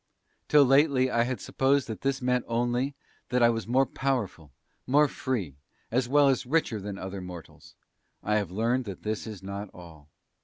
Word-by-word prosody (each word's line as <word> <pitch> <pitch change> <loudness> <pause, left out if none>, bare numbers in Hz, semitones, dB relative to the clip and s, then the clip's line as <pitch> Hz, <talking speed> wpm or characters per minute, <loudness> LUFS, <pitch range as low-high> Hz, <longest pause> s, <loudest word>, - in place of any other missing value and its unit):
"Till 150 -1 +6
lately 135 -1 +4
I 115 -1 +2
had 130 0 -3
supposed 135 +1 +1
that 110 -2 -6
this 135 -1 -1
meant 125 -1 +1
only 120 +4 -1 0.3
that 125 0 +2
I 120 - +6
was 115 -1 -4
more 130 +3 +3
powerful, 120 - -3 0.4
more 145 +3 +5
free, 115 - -3 0.3
as 125 +1 0
well 145 +1 +5
as 135 -2 +2
richer 135 -6 +1
than 100 0 -6
other 95 0 -6
mortals. 90 -2 -11 0.5
I 105 0 +1
have 100 -5 -2
learned 115 +6 0
that 100 -3 -8
this 110 +1 -3
is 105 -4 -8
not 100 +1 -6
all. 80 -4 -13
120 Hz, 180 wpm, -27 LUFS, 100-130 Hz, 0.5 s, Till